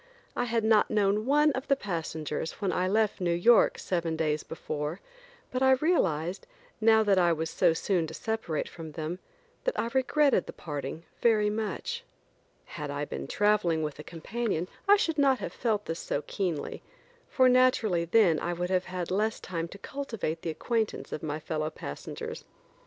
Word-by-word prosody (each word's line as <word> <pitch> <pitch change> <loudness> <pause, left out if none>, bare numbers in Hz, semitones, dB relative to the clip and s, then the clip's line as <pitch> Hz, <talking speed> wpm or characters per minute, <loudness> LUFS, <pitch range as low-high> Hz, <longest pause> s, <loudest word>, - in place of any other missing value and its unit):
I 245 - 0
had 230 -1 0
not 220 -1 +4
known 210 +1 +1
one 295 +2 +5
of 265 +1 -4
the 275 - +4
passengers 160 - -3
when 195 -3 -2
I 180 +1 0
left 215 0 +1
New 170 -1 +1
York 230 +7 +5
seven 170 -3 -1
days 155 -1 0
before, 155 +1 -4 0.5
but 255 - -2
I 265 0 +6
realized, 190 - +1 0.3
now 220 0 +6
that 200 -3 +3
I 175 -1 +4
was 160 0 -1
so 165 - +3
soon 170 0 0
to 160 - -8
separate 220 -9 -2
from 160 -2 -9
them, 160 +3 -4 0.4
that - - -1
I 230 - -1
regretted 270 -3 +3
the - - -7
parting 150 +1 -5 0.2
very 215 -3 +4
much. 225 - -3 0.6
Had 150 -1 -6
I 145 +1 -2
been - - -6
traveling 200 -6 +2
with 150 -1 -4
a - - -6
companion 180 +2 -3 0.2
I 410 - +9
should 325 -6 0
not 270 -2 +4
have 205 - -5
felt 215 -3 -1
this 165 +1 -4
so 145 - -2
keenly, 175 -7 -3 0.5
for 260 -2 +4
naturally 250 -9 +3
then 170 -3 +4
I 175 - -2
would 180 +1 -3
have 185 -1 +1
had 180 -1 -4
less 215 +3 0
time 170 -2 -4
to 200 - -11
cultivate 225 - -4
the 170 - -3
acquaintance 220 +6 -2
of - - -4
my 155 -1 -3
fellow 155 0 -2
passengers. 70 - -7
185 Hz, 180 wpm, -29 LUFS, 160-225 Hz, 0.6 s, I